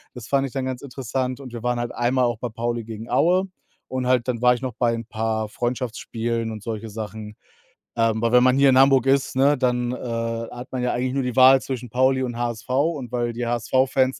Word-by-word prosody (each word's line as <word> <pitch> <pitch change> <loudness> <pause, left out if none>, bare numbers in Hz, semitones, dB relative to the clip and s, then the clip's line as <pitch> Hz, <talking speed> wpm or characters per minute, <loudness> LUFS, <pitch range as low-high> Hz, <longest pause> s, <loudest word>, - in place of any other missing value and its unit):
Das 120 -3 -9
fand 135 +1 +1
ich 130 - -12
dann 135 -1 -2
ganz 130 -1 -4
interessant 130 -1 -3
und 125 -3 -10
wir 120 - -6
waren 125 0 0
halt 120 0 -3
einmal 125 +1 +1
auch 120 -2 -1
bei 125 - -3
Pauli 120 +1 -3
gegen 115 0 -8
Aue 180 +9 +3 0.4
und 130 -1 -2
halt 125 -1 +2
dann 120 -2 -2
war 125 0 +6
ich 125 - -5
noch 130 -2 -4
bei 120 -2 +2
'n 115 -1 -4
paar 110 -1 -2
Freundschaftsspielen 115 -1 -3
und 110 -1 -7
solche 115 -1 -5
Sachen. 105 0 -7 0.6
Ähm, 115 -1 +1
aber 115 - +2
wenn 125 - +6
man 130 0 +4
hier 140 0 +5
in 130 - +4
Hamburg 135 -1 +5
ist, 135 -1 +2
ne, 140 +2 +4
dann, 125 -1 0
äh, - - -4 0.5
hat 125 +1 -9
man 125 -1 -3
ja 125 - 0
eigentlich 125 +1 -1
nur 135 - 0
die 125 -1 -3
Wahl 130 +1 +8
zwischen 125 -2 -5
Pauli 130 +3 +2
und 120 -2 -4
HSV. 120 0 -4
Und 140 -2 0
weil 120 -1 -1
die 120 0 -3
HSV-Fans 130 +2 +1
125 Hz, 235 wpm, -23 LUFS, 115-130 Hz, 0.6 s, Wahl